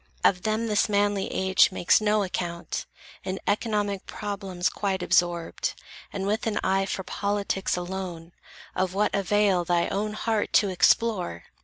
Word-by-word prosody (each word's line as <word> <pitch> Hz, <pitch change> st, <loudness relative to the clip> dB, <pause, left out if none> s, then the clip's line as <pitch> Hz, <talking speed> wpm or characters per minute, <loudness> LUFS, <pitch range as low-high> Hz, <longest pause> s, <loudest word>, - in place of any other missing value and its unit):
Of 180 Hz, -2 st, +4 dB
them, 220 Hz, +2 st, 0 dB
this 210 Hz, -1 st, +1 dB
manly 205 Hz, -1 st, +1 dB
age 190 Hz, 0 st, +3 dB
makes 185 Hz, +2 st, +3 dB
no 210 Hz, 0 st, +2 dB
account, 175 Hz, -2 st, -4 dB, 0.4 s
In 185 Hz, +1 st, -3 dB
economic 205 Hz, -2 st, -1 dB
problems 195 Hz, -3 st, -3 dB
quite 190 Hz, -3 st, -2 dB
absorbed, 175 Hz, -1 st, 0 dB, 0.3 s
And 195 Hz, -1 st, -3 dB
with 215 Hz, +3 st, -1 dB
an 215 Hz, -, -1 dB
eye 195 Hz, 0 st, +1 dB
for 190 Hz, -, -3 dB
politics 200 Hz, -1 st, -1 dB
alone, 180 Hz, -2 st, -5 dB, 0.4 s
Of 185 Hz, 0 st, -1 dB
what 210 Hz, +1 st, +1 dB
avail, 200 Hz, -2 st, +2 dB
thy 175 Hz, 0 st, +1 dB
own 210 Hz, +1 st, -2 dB
heart 220 Hz, 0 st, -1 dB
to 205 Hz, -, +4 dB
explore? 180 Hz, -, +2 dB
195 Hz, 145 wpm, -26 LUFS, 180-205 Hz, 0.4 s, Of